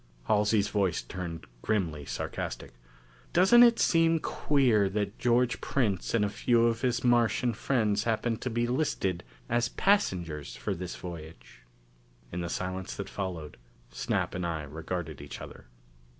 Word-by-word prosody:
Halsey's 105 - +2
voice 95 -5 0
turned 85 -4 -6 0.2
grimly 80 - -1
sarcastic. 70 - -5 0.6
"Doesn't 190 +7 +7
it 235 -1 +7
seem 165 -1 +3
queer 125 -11 +2
that 100 +1 -3
George 120 -1 +2
Prince 110 -7 0
and 105 -3 +3
a - - -1
few 115 +2 +2
of 115 -1 +1
his 125 -1 0
Martian 120 0 +3
friends 110 -3 0
happen 115 0 0
to 130 - -4
be 120 0 0
listed 120 - -1 0.2
as 120 +1 +1
passengers 90 - 0
for 100 - -3
this 90 0 -5
voyage?" 80 -9 -10 0.7
In 90 - -3
the 85 - -3
silence 95 +1 -4
that 100 - -5
followed, 90 -6 -5 0.3
Snap - - -1
and 90 - -3
I 80 -3 -2
regarded 80 +1 -5
each 70 - -8
other. 65 -1 -11
105 Hz, 145 wpm, -29 LUFS, 85-120 Hz, 0.7 s, Doesn't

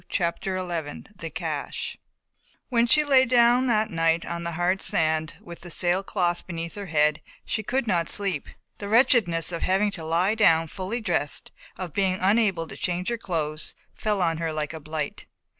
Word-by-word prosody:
CHAPTER 185 +2 -1
XI 170 -5 -4
THE 165 -3 -6
CACHE - - -4 0.7
When 235 -2 +3
she 300 +6 +5
lay 270 -3 +5
down 245 +1 +4
that 220 -2 +2
night 165 0 +1
on 170 0 -4
the 170 0 -3
hard 175 +3 0
sand, 160 0 +1
with 170 -1 -11
the 175 - -9
sailcloth 175 0 0
beneath 165 -2 -5
her 200 -1 -7
head, 150 -1 +2 0.2
she 220 - -1
could 240 +5 -1
not 175 -6 0
sleep. 195 -8 -2 0.3
The 200 - -5
wretchedness 210 - +4
of 170 - -3
having 195 +2 +2
to 170 -5 -6
lie 170 +6 +2
down 165 -7 +4
fully 200 +7 -4
dressed, 145 -9 -2 0.3
of 180 -5 -6
being 190 -2 +1
unable 195 -4 +2
to - - -8
change 180 +2 -2
her 235 - -1
clothes, 155 -6 -3 0.2
fell 210 -3 0
on 165 -2 +1
her 165 -1 -1
like 155 0 -3
a 160 - -6
blight. 155 0 -5
175 Hz, 175 wpm, -25 LUFS, 165-210 Hz, 0.7 s, she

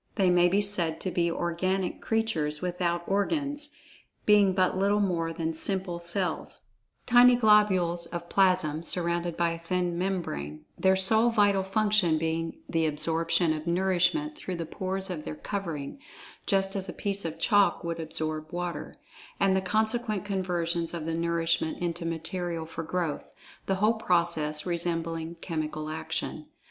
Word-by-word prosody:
They 190 -4 +3
may 175 0 +5
be 195 +3 +2
said 175 -6 +1
to 185 - -2
be 170 -1 +1
"organic" 175 +2 -1
creatures 165 -10 -1
without 175 -1 -1
organs—being 280 - 0
but 185 -1 +2
little 200 +2 +2
more 170 -5 0
than 165 0 -3
simple 185 +1 -3
cells—tiny 225 +7 +1
globules 190 -7 +3
of 170 0 -6
plasm, 180 -6 +2
surrounded 170 0 -1
by 170 -1 +2
a 165 - -5
thin 175 0 -1
membrane—their 175 - -1
sole 220 +5 +5
vital 205 -4 +3
function 195 -4 +2
being 165 - -3
the 165 -1 +1
absorption 165 +2 +1
of 155 +1 -6
nourishment 190 - +1
through 190 -11 -5
the 170 -1 -4
pores 190 +2 -1
of 160 -4 -5
their 155 - -5
covering 165 - -5 0.5
(just 195 -1 +1
as 190 -1 -2
a - - -5
piece 200 -1 +1
of 165 -1 -5
chalk 205 +1 +3
would 170 0 -3
absorb 155 -1 -4
water) 175 0 -4 0.4
and 195 -1 +3
the 190 - +2
consequent 220 +1 0
conversion 175 -4 -1
of 165 -2 -4
the 165 - -2
nourishment 165 -1 0
into 170 -1 -3
material 165 0 -3
for 165 0 -6
growth, 165 -2 -3 0.4
the 195 - +1
whole 210 +4 +3
process 170 -7 0
resembling 165 -1 -2
chemical 155 -2 -4
action. 155 +1 -4
175 Hz, 145 wpm, -28 LUFS, 165-195 Hz, 0.5 s, may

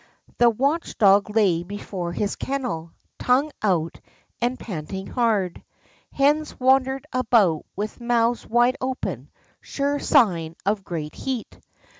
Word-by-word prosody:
The 240 0 +7
watch 280 +9 -1
dog 200 0 +5
lay 200 -6 +2
before 185 -1 -5
his 200 +4 -2
kennel, 245 -12 -4 0.3
tongue 270 +5 +2
out 175 -6 0 0.4
and 245 +2 0
panting 190 0 -6
hard. 215 -8 0 0.5
liens 295 +2 +2
wandered 265 +1 +2
about 225 -10 +2
with 210 +4 -5
mouths 235 0 +1
wide 240 +3 +3
open, 260 0 -4 0.3
sure 285 +1 -2
sign 175 - +2
of 200 0 0
great 155 -5 -5
heat. 260 -4 -5
230 Hz, 120 wpm, -23 LUFS, 190-260 Hz, 0.5 s, The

